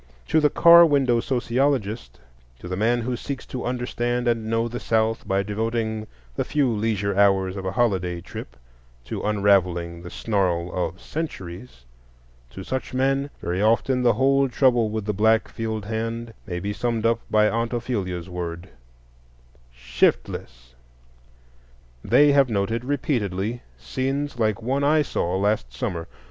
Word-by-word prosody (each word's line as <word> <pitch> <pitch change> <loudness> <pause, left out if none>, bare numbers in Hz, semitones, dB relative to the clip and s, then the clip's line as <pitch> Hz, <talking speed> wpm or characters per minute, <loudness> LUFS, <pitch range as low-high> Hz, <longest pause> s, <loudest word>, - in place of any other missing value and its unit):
To 160 - +4
the 150 -1 +4
car 170 +2 +8
window 135 -7 +3
sociologist, 115 - -1 0.4
to 90 - -10
the 90 - -3
man 115 +5 +1
who 125 +2 -2
seeks 135 +2 -6
to 125 - -6
understand 120 0 -2
and 115 -2 0
know 115 +1 +1
the 120 +1 -5
South 110 0 0
by 95 0 +1
devoting 110 +1 -2 0.3
the - - 0
few 140 -5 +1
leisure 105 -2 -1
hours 95 -1 +3
of 95 -1 -6
a 95 - -3
holiday 95 -8 0
trip 65 -7 -9 0.5
to - - -5
unravelling 90 -5 +1
the 90 - -8
snarl 90 -6 -1
of 90 0 -3
centuries,—to - - -9
such 130 +3 -4
men 135 +2 +1
very 90 +3 -1
often 115 +4 +2
the 120 -1 +4
whole 135 0 +3
trouble 120 -3 +3
with 110 -1 -3
the 105 - -1
black 110 +3 +3
field 110 -2 -4
hand 115 +1 -4
may 90 -3 -3
be 100 +3 -3
summed 115 0 -2
up 115 0 +3
by 105 0 +4
Aunt 115 +1 -1
Ophelia's 100 -8 -3
word, 90 0 -6 1.0
"Shiftless!" - - -1 1.3
They 145 0 +5
have 140 -2 +4
noted 110 +2 -1
repeatedly 120 - -1 0.2
scenes 135 0 -3
like 110 0 0
one 135 +4 0
I 150 +1 +4
saw 90 -8 -1
last 100 - 0
summer. 85 +7 -4
110 Hz, 145 wpm, -24 LUFS, 95-125 Hz, 1.3 s, car